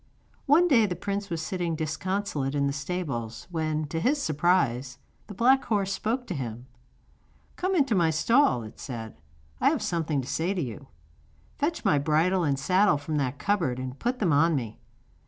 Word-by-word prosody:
One 325 +6 +5
day 235 -9 +4
the 180 - -3
prince 200 +1 -3
was 165 -2 -3
sitting 175 -1 -2
disconsolate 155 -2 -2
in 140 -1 +1
the 140 - 0
stables 140 -7 -4
when, 155 -2 -1
to 165 - -2
his 280 - +1
surprise, 145 - +1 0.3
the 205 - -9
black 260 +5 +4
horse 200 -3 0
spoke 240 +6 -2
to 190 - -4
him. 120 -4 -5 0.9
'Come 375 +1 -1
into 275 -8 +2
my 170 -5 +3
stall,' 195 - +3
it 110 - -11
said, 110 - -7 0.4
'I 275 - +4
have 295 -5 -1
something 165 -7 -1
to 130 - -4
say 175 +7 -1
to 180 - -1
you. 120 -5 -7 0.7
Fetch 325 +3 -1
my 145 - +4
bridle 160 +5 +2
and 140 -3 +1
saddle 185 +4 +3
from 150 +2 -3
that 135 -1 -1
cupboard 180 -12 0
and 130 +1 -6
put 245 +2 -1
them 185 -10 +1
on 160 +3 +4
me. 115 -5 -4
165 Hz, 180 wpm, -27 LUFS, 140-205 Hz, 0.9 s, One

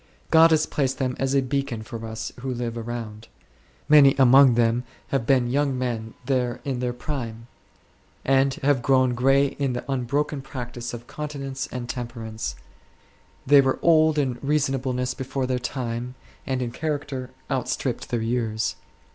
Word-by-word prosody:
God 165 0 +7
has 155 -1 +3
placed 135 -3 -1
them 130 -2 -1
as 135 +1 0
a 135 - +3
beacon 130 -4 -2
for 115 0 -7
us 110 0 -5
who 130 +1 -3
live 120 -1 -3
around; 115 -2 -6 0.6
many 145 -2 +7
among 130 -1 +7
them 120 +1 +2 0.3
have 135 -5 -1
been 130 -3 +3
young 140 -1 +1
men 115 -3 -3
there 125 -3 0
in 135 -3 -2
their 125 0 -1
prime, 120 -3 -5 0.8
and 135 0 +3
have 140 -2 +3
grown 130 -1 +3
gray 135 +3 +4
in 135 -3 0
the 125 - -4
unbroken 140 +2 -1
practice 120 -2 -6
of 120 0 -10
continence 140 -2 -5
and 125 -1 -5
temperance; 115 - -5 0.9
they 140 +1 +7
were 135 -1 +1
old 160 -2 +5
in 130 -4 0
reasonableness 135 -3 0
before 130 0 -3
their 125 0 -1
time, 125 0 -4 0.3
and 130 -2 -1
in 120 - -3
character 145 -3 -3 0.2
outstripped - - -2
their 120 -2 -1
years. 115 -2 -1
130 Hz, 155 wpm, -24 LUFS, 120-140 Hz, 0.9 s, God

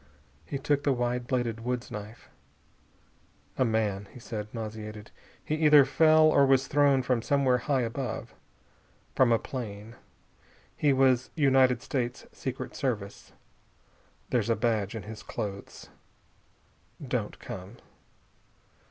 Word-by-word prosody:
He 140 - -3
took 145 +1 0
the 145 - +1
wide 120 0 -2
bladed 120 -3 -1
woods 125 +1 -4
knife. 105 +2 -8 1.3
"A - - +2
man," 105 -4 0
he - - -12
said, 105 -2 -6
nauseated. 110 -1 -7 0.3
"He - - -2
either 150 -3 +7
fell 155 +1 +5
or 155 -2 +5
was 135 0 +4
thrown 140 -2 +3
from 125 -2 +1
somewhere 130 -1 +2
high 135 +1 0
above. 120 +3 -4 0.8
From 130 -3 +4
a 115 - +5
plane. 110 -4 -7 0.8
He 145 - +2
was 130 -2 +3
United 130 -5 +3
States 125 -2 -3
Secret 130 -1 -6
Service. 110 -7 -4 1.0
There's 120 -3 +1
a 115 - +3
badge 110 -2 0
in 110 - -5
his 110 0 -9
clothes. 100 -1 -7 1.2
Don't - - -2
come." 95 +5 -9
125 Hz, 125 wpm, -28 LUFS, 110-135 Hz, 1.3 s, either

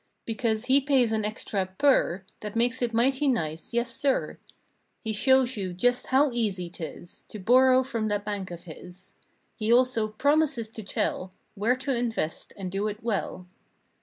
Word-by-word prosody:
Because 225 0 -1
he 270 +2 +4
pays 265 -4 +2
an 220 -1 0
extra 210 -2 -2
PER 230 -10 +3 0.2
That 210 0 -7
makes 245 +2 +1
it 240 -1 0
mighty 265 +5 +2
nice, 160 - -1
yes 235 0 -1
sir. 275 -2 0 0.6
He 220 -1 -2
shows 260 +3 +3
you 190 -4 -4
just 245 +7 +1
how 275 +1 +3
easy 195 -7 -2
'tis 175 0 -8
To - - -8
borrow 255 +5 +5
from 230 -4 -2
that 205 -1 -1
bank 205 -3 -3
of 170 -1 -8
his. 180 +2 -12 0.4
He 220 0 -1
also 245 -3 +3
promises 275 0 +1
to 220 - -8
tell 190 -2 -2 0.2
Where 220 +4 +1
to 265 +1 -2
invest 230 -9 -2
and 190 -2 -5
do 200 +2 -1
it 210 +1 -6
well. 200 -5 -2
225 Hz, 165 wpm, -27 LUFS, 200-255 Hz, 0.6 s, borrow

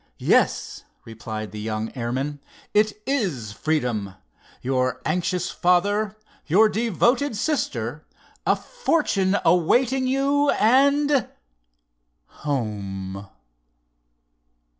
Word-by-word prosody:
"Yes," - - +1 0.2
replied 110 -1 -6
the 105 - -7
young 110 +1 -3
airman, 130 +4 -3 0.3
"it 215 0 +2
is 180 - -1
freedom—your 125 0 -3
anxious 180 +3 -1
father—your 205 +1 +1
devoted 235 +4 +1
sister—a 300 +6 -2
fortune 295 - 0
awaiting 245 +10 +3
you 280 +2 +2
and—home!" 100 - -1
170 Hz, 65 wpm, -23 LUFS, -, 0.3 s, awaiting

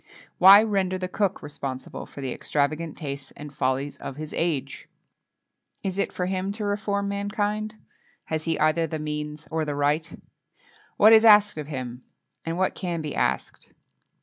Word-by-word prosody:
Why 195 +3 +9
render 195 -4 0
the 185 0 -3
cook 195 +1 -1
responsible 135 -3 -6
for 140 - -10
the 130 -2 -3
extravagant 155 +4 -1
tastes 140 -3 -5
and 145 0 -9
follies 135 +1 -1
of 135 - -7
his 155 +1 -7
age? 165 -5 -2 0.9
Is 195 0 -3
it - - 0
for 180 - -2
him 190 +1 -2
to 215 0 -4
reform 205 0 -1
mankind? 205 +1 -2 0.5
Has 155 -1 -3
he 165 - 0
either 155 +2 +2
the 160 - -4
means 150 0 -5
or 160 0 0
the 145 -1 -3
right? 150 +3 0 0.8
What 215 +2 +7
is 220 0 +7
asked 210 -5 +6
of 150 - -5
him? 130 -4 -6 0.4
and 165 +1 -3
what 185 0 +1
can 170 -4 -3
be 150 - -4
asked? - - -2
165 Hz, 165 wpm, -25 LUFS, 150-200 Hz, 0.9 s, Why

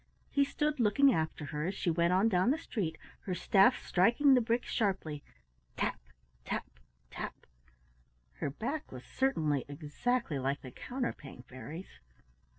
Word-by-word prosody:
He 280 - +4
stood 295 +1 -1
looking 245 +5 +5
after 160 -1 -2
her 150 +3 -3
as 190 - -2
she 175 - 0
went 170 +1 +2
on 190 +4 +4
down 185 +1 +3
the 290 - +3
street, 185 - -3 0.3
her 185 - 0
staff 195 +7 +4
striking 235 +10 +4
the 250 - +5
bricks 235 +1 -1
sharply, 180 -9 -1 0.5
tap! - - -1 0.4
tap! - - -3 0.5
tap! - - -6 0.9
Her - - -2
back 255 - -4
was 125 -1 -8
certainly 155 - 0
exactly 150 - -1
like 135 +2 -1
the 130 - -9
Counterpane 155 - -5
Fairy's. 150 +8 -9
185 Hz, 145 wpm, -32 LUFS, 150-245 Hz, 0.9 s, looking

